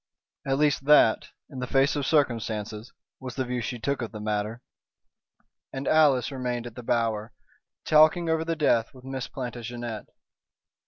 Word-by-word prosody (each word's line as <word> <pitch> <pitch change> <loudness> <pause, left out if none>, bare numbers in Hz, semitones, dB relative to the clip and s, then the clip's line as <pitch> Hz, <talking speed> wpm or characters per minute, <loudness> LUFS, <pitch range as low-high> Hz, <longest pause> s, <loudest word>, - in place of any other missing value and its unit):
At 135 0 +1
least 145 -2 +1
that 145 -6 +5 0.2
in 135 - -9
the 125 - -3
face 135 +3 +2
of 145 -2 -2
circumstances 115 -6 -1 0.3
was 130 -3 -7
the 130 - -1
view 125 0 -3
she 120 - -4
took 140 +3 -2
of 115 - -4
the 110 - -8
matter. 105 +2 -3 1.1
And 135 +1 -5
Alice 145 -5 +4
remained 125 -3 -3
at 120 - -8
The 125 - -8
Bower, 115 -2 -1 0.5
talking 155 +3 +5
over 160 0 +1
the 165 0 -2
death 125 -5 +1
with 130 0 -14
Miss 135 -1 -4
Plantagenet. 120 -2 -6
125 Hz, 160 wpm, -26 LUFS, 115-140 Hz, 1.1 s, that